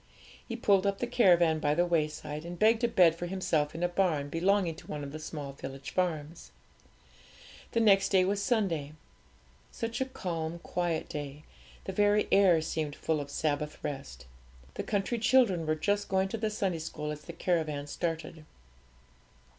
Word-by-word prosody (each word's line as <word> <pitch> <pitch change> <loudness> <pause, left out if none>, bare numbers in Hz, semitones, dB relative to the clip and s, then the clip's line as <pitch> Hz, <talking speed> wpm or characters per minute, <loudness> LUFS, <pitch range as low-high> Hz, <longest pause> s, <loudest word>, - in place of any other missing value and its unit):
He 230 - -4
pulled 200 -4 +3
up 200 0 0
the 245 - -1
caravan 175 -9 +4
by 150 0 +1
the 175 +2 +3
wayside, 155 -2 -2
and 175 +1 -7
begged 220 +3 +3
a - - +5
bed 185 -8 +5
for 175 +1 -5
himself 160 -5 0
in 165 - -3
a - - +4
barn 175 -6 0
belonging 180 +2 +2
to - - -13
one 150 -1 -5
of 140 - -6
the 155 - -7
small 150 -3 -6
village 135 0 -8
farms. 165 -3 -2 1.2
The 230 - +2
next 195 -3 +5
day 185 -2 +4
was 200 +1 0
Sunday. 185 - 0 0.8
Such 230 +1 -4
a - - +2
calm, 170 -9 -4
quiet 170 -1 -2
day, 145 0 -6 0.4
the 190 - -5
very 205 +2 +3
air 185 -5 +5
seemed 155 -2 -3
full 155 -2 -1
of 140 - -7
Sabbath 150 0 -2
rest. 135 - -6 0.5
The - - -4
country 210 +3 -1
children 220 -9 +3
were 155 - +2
just 205 +5 -1
going 190 0 +1
to 225 - -3
the 220 0 0
Sunday 195 -5 -1
school 150 -1 -5
as 150 0 -6
the - - -8
caravan 155 -5 -1
started. 160 +1 -4
170 Hz, 175 wpm, -30 LUFS, 150-195 Hz, 1.2 s, a